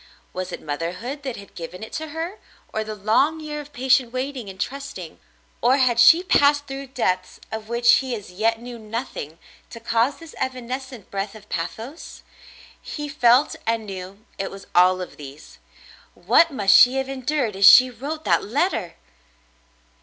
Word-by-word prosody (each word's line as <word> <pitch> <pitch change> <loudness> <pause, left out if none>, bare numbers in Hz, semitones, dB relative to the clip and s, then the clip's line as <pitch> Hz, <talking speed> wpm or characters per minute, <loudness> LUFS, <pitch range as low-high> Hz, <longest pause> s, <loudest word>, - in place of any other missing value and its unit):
Was 185 0 -4
it - - -7
mother 160 +3 -3
hood 265 +8 -6
that 265 -4 -5
had 200 -1 -13
given 175 +4 -8
it 220 - -9
to 315 0 -4
her, 330 +7 -5 0.3
or 220 - -1
the 215 0 -6
long 225 +10 +2
year 300 -1 -5
of 295 0 -14
patient 255 -2 +2
waiting 255 -3 -4
and 190 -1 -11
trusting; 275 +7 -6 0.4
or 250 +3 +4
had 250 -3 +2
she 325 +9 +7
passed 290 -6 +3
through 275 0 -7
depths 185 -8 -2
of 220 0 -6
which 235 0 +5
he 260 -2 -2
as 205 -4 -9
yet 225 +4 0
knew 240 0 -9
nothing, 215 - -6 0.3
to 230 - -10
cause 230 +3 0
this 330 -2 -12
evanescent 255 -2 -5
breath 200 +1 -4
of 210 -1 -14
pathos? 220 - -6 0.6
He 295 -1 -6
felt 255 0 +3
and 225 -1 0
knew 195 +2 -9
it 195 - -2
was 195 0 -11
all 185 +1 +4
of 180 - -8
these. 145 +1 -12 0.6
What 335 - +4
must 205 -9 +3
she 250 +2 +7
have 265 0 -1
endured 265 -4 -2
as 195 +1 +6
she 255 +3 +8
wrote 295 +7 -6
that - - +2
letter 225 - -1
240 Hz, 175 wpm, -23 LUFS, 200-275 Hz, 0.6 s, she